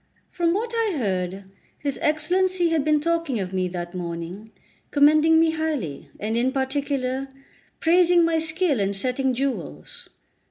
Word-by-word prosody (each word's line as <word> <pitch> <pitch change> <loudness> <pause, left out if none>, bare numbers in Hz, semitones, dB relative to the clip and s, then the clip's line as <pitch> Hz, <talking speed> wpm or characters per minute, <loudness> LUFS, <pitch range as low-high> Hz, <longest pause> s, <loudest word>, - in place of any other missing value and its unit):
From 340 -1 +1
what 455 +3 -2
I 450 -5 0
heard, 190 -4 -2 0.3
his 285 -2 -3
Excellency 355 +4 +2
had 320 -3 +1
been 305 0 +3
talking 330 -5 -1
of 185 -1 -4
me 185 -1 0
that 175 0 -6
morning, 175 +4 -6 0.4
commending 310 +2 +5
me 325 0 +4
highly, 305 - -3
and 215 +2 -2
in 245 +2 +1
particular 270 -1 -2 0.5
praising 345 0 +4
my 330 -1 +1
skill 320 - 0
in 200 0 0
setting 255 +5 0
jewels. 215 - -4
280 Hz, 145 wpm, -24 LUFS, 200-325 Hz, 0.5 s, commending